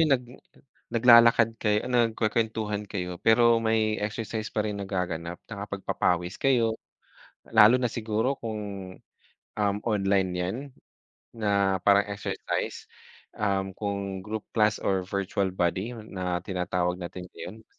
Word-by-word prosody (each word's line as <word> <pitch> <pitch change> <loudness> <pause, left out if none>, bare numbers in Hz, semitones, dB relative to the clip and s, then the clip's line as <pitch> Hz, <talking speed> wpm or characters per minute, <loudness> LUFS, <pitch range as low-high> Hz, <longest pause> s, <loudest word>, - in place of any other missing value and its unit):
yung 155 -3 +4
nag 125 - -12 0.7
naglalakad 115 -1 +6
kayo, 105 0 +1
nagkwekwentuhan 110 -3 0
kayo 90 -3 -4
pero 115 +1 +5
may 110 -1 +1
exercise 110 +1 -3
pa 105 - 0
rin 105 -1 -2
nagaganap, 90 -3 -3
nakapagpapawis 100 -3 -2
kayo, 120 -5 +2 0.7
lalo 110 +2 +7
na 125 - -1
siguro 110 +3 -1
kung, 110 -2 -4 1.0
um, 100 -1 +1
online 100 -3 +2
yan 90 +3 -2 0.8
na 100 -3 +1
parang 100 +1 +5
exercise, 100 0 -4 0.5
um, 95 -2 0
kung 100 -2 -3
group 110 +1 -5
class 105 -1 +3
or 95 -1 +1
virtual 100 0 -1
body 95 +5 -1
na 95 -5 -4
tinatawag 90 -1 -1
natin 90 +1 -7
ngayon. 110 +5 -9
105 Hz, 120 wpm, -27 LUFS, 95-110 Hz, 1.0 s, lalo